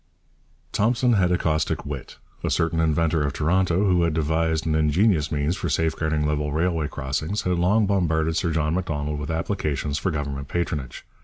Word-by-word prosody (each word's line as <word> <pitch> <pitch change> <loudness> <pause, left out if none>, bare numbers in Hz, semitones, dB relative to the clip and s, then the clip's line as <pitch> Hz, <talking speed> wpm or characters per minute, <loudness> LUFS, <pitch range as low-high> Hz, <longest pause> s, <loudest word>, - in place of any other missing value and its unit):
Thompson 120 +3 +2
had 90 -4 +3
a 90 - +3
caustic 80 -2 -1
wit. 70 -3 -7 0.3
A - - 0
certain 80 0 +1
inventor 80 0 +2
of 70 -1 -1
Toronto, 90 +5 +1
who 90 -3 +3
had 85 -2 +1
devised 80 0 0
an 80 - +1
ingenious 80 +2 +2
means 75 +3 0
for 90 -3 -3
safeguarding 80 0 0
level 75 0 -1
railway 80 0 0
crossings, 75 +8 -3
had 90 -1 0
long 105 +5 +3
bombarded 80 -5 +1
Sir 85 - 0
John 80 -1 0
Macdonald 75 -5 -2
with 75 +1 -5
applications 80 -4 -2
for - - -1
Government 70 -3 -3
patronage. 75 -7 -3
80 Hz, 170 wpm, -24 LUFS, 75-90 Hz, 0.3 s, had